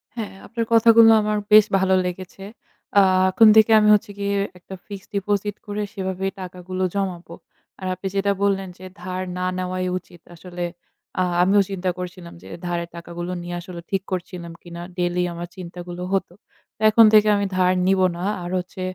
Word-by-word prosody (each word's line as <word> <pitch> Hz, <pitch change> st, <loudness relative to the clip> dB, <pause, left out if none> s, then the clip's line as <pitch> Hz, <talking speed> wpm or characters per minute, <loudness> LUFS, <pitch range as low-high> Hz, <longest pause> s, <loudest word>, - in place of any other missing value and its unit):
হ্যাঁ, 220 Hz, -5 st, -5 dB
আপনার 230 Hz, -1 st, -3 dB
কথাগুলো 230 Hz, 0 st, +7 dB
আমার 210 Hz, 0 st, 0 dB
বেশ 215 Hz, -1 st, +8 dB
ভালো 190 Hz, 0 st, +2 dB
লেগেছে। 185 Hz, +1 st, -6 dB, 0.6 s
আ -, -, +8 dB, 0.3 s
এখন 225 Hz, +4 st, +6 dB
থেকে 220 Hz, 0 st, +6 dB
আমি 210 Hz, 0 st, +4 dB
হচ্ছে 210 Hz, 0 st, -3 dB
গিয়ে 200 Hz, 0 st, -1 dB, 0.2 s
একটা 190 Hz, +2 st, -10 dB
fixed 200 Hz, -1 st, -9 dB
deposit 205 Hz, +1 st, -1 dB
করে 205 Hz, 0 st, -4 dB
সেভাবে 190 Hz, -1 st, -3 dB, 0.2 s
টাকাগুলো 185 Hz, 0 st, -5 dB
জমাবো। 180 Hz, -4 st, -3 dB, 0.4 s
আর 185 Hz, -, -5 dB
আপনি 185 Hz, +1 st, -5 dB
যেটা 200 Hz, 0 st, +1 dB
বললেন 195 Hz, -1 st, +1 dB
যে 185 Hz, -, -11 dB, 0.2 s
ধার 185 Hz, 0 st, -4 dB, 0.2 s
না 180 Hz, -, -2 dB
নেওয়াই 185 Hz, 0 st, -2 dB
উচিত, 175 Hz, -2 st, -13 dB
আসলে 175 Hz, +1 st, -7 dB, 0.6 s
আ -, -, +3 dB, 0.2 s
আমিও 200 Hz, +2 st, +4 dB
চিন্তা 190 Hz, -1 st, -2 dB
করছিলাম 180 Hz, -1 st, -8 dB
যে -, -, -12 dB, 0.2 s
ধারের 170 Hz, -1 st, -3 dB
টাকাগুলো 175 Hz, +1 st, -6 dB
নিয়ে 175 Hz, 0 st, -6 dB
আসলে 175 Hz, -1 st, -9 dB
ঠিক 195 Hz, -1 st, 0 dB
করছিলাম 175 Hz, -2 st, -5 dB
কিনা। 170 Hz, 0 st, -9 dB, 0.2 s
daily 180 Hz, 0 st, 0 dB
আমার 170 Hz, +1 st, -6 dB
চিন্তাগুলো 175 Hz, 0 st, -8 dB
হতো। 190 Hz, -2 st, -1 dB, 0.4 s
তো -, -, -21 dB
এখন 225 Hz, +1 st, +7 dB
থেকে 215 Hz, 0 st, +6 dB
আমি 200 Hz, -, 0 dB
ধার 185 Hz, 0 st, +3 dB
নিবো 190 Hz, -1 st, +3 dB
না। 175 Hz, -, -5 dB, 0.2 s
আর 175 Hz, -, -5 dB
হচ্ছে 185 Hz, +1 st, -6 dB
185 Hz, 175 wpm, -22 LUFS, 180-200 Hz, 0.6 s, বেশ